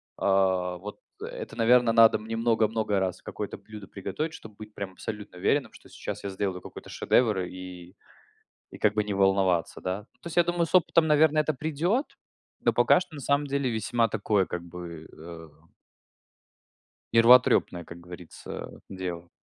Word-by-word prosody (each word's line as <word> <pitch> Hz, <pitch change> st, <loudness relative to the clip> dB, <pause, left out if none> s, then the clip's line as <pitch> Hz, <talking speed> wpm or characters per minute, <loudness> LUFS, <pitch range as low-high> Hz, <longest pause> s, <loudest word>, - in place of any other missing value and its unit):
А, 95 Hz, -2 st, +1 dB
вот 105 Hz, +4 st, -9 dB, 0.2 s
это, -, -, -7 dB
наверно, 120 Hz, +1 st, +4 dB
надо 115 Hz, 0 st, +6 dB
мне 110 Hz, +1 st, -5 dB
много-много 110 Hz, -2 st, +1 dB
раз 95 Hz, -2 st, -2 dB
какое-то -, -, -6 dB
блюдо 105 Hz, -2 st, -11 dB
приготовить, 125 Hz, -, -4 dB
чтобы 110 Hz, -, -12 dB
быть 105 Hz, 0 st, -11 dB
прям 100 Hz, -2 st, -5 dB
абсолютно 105 Hz, -1 st, -8 dB
уверенным, -, -, +1 dB
что -, -, -16 dB
сейчас -, -, -7 dB
я 100 Hz, -, -3 dB
сделаю 95 Hz, -1 st, -3 dB
какой-то -, -, -11 dB
шедевр, 110 Hz, -6 st, +2 dB
и, 90 Hz, -1 st, -10 dB, 0.8 s
и -, -, -10 dB
как -, -, +2 dB
бы 105 Hz, -, +1 dB
не 105 Hz, -, -3 dB
волноваться, 95 Hz, -3 st, +1 dB
да. 95 Hz, +3 st, -3 dB, 0.2 s
То -, -, -6 dB
есть 170 Hz, -, -8 dB
я 175 Hz, -, +6 dB
думаю, 175 Hz, 0 st, 0 dB
с 165 Hz, -, -13 dB
опытом, 170 Hz, -2 st, +4 dB
наверное, 155 Hz, 0 st, +4 dB
это 155 Hz, -, -1 dB
придет. 160 Hz, -, -1 dB, 0.6 s
Но -, -, +3 dB
пока -, -, +4 dB
что, 175 Hz, -3 st, -9 dB
на 145 Hz, -, -7 dB
самом 140 Hz, +2 st, +1 dB
деле, 140 Hz, -1 st, -1 dB
весьма 115 Hz, +1 st, 0 dB
такое, 105 Hz, -3 st, +1 dB
как 90 Hz, -, -5 dB
бы, 85 Hz, -2 st, -9 dB
э 80 Hz, 0 st, -11 dB, 1.7 s
нервотрепное, 115 Hz, -6 st, +5 dB
как 85 Hz, +1 st, -11 dB
говорится, 90 Hz, -1 st, -9 dB
дело. 90 Hz, -2 st, -6 dB
105 Hz, 165 wpm, -27 LUFS, 90-125 Hz, 1.7 s, надо